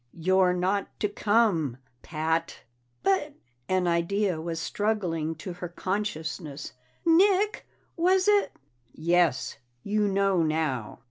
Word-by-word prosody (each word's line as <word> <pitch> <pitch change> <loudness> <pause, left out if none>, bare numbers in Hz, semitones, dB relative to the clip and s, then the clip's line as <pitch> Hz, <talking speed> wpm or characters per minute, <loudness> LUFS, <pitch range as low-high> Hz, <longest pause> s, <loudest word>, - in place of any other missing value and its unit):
"You're 185 +2 +3
not 190 +3 0
to 210 - +3
come, 205 - +1 0.2
Pat!" 160 +1 -2 0.4
"But 280 +10 +1 0.2
" 120 - -44
An 185 -1 +2
idea 170 +1 0
was 165 0 -4
struggling 170 -5 -1
to 175 +3 -7
her 175 0 -6
consciousness. 160 -6 -4 0.3
"Nick, 390 +5 +3 0.3
was 370 +3 +3
it 415 -1 +4 0.3
?" 120 0 -39
"Yes. 170 -5 +1 0.3
You 210 0 +1
know 195 -2 +2
now." 155 -8 -1
180 Hz, 120 wpm, -27 LUFS, 160-210 Hz, 0.4 s, it